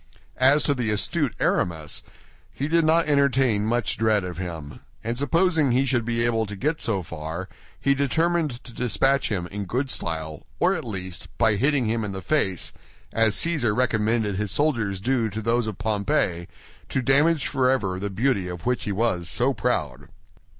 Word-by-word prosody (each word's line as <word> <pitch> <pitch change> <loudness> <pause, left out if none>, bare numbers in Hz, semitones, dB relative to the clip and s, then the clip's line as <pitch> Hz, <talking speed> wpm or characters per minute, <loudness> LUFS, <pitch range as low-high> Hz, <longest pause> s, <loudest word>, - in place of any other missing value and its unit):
As 135 +3 +5
to 145 - +2
the 125 -5 -2
astute 125 - 0
Aramis, 80 -4 0 0.5
he 140 - -3
did 165 +1 +3
not 165 +2 +4
entertain 135 -7 +2
much 120 -2 -1
dread 110 -3 +2
of 90 -1 -6
him; 80 -5 -6 0.2
and 115 +2 -2
supposing 160 +2 +2
he 130 +2 +3
should 120 -4 0
be 115 0 0
able 115 -2 +1
to 100 - -6
get 150 +10 -1
so 100 -5 0
far, 80 +3 -6 0.3
he 140 - +3
determined 155 -1 0
to 120 - -13
dispatch 135 +3 +1
him 95 -6 -2
in 100 0 -4
good 130 +8 -1
style 80 -2 -4
or - - +3
at - - -4
least, 95 -4 -6
by 110 -3 +3
hitting 135 +3 +2
him 110 +1 0
in 100 -2 -4
the 95 - -5
face, 95 - 0 0.4
as 110 -2 +3
Cæsar 140 -11 +2
recommended 110 -4 +1
his 105 0 -1
soldiers 115 -7 +1
do 120 +1 0
to 105 +2 -5
those 115 +1 0
of 110 - -4
Pompey, 100 -5 0 0.4
to 130 - -1
damage 145 +3 +3
forever 125 -9 +1
the 100 +1 -3
beauty 105 -2 0
of 90 -1 -7
which 125 0 0
he 105 - -2
was 95 -5 0
so - - +1
proud. 60 0 -2
115 Hz, 180 wpm, -24 LUFS, 95-135 Hz, 0.5 s, As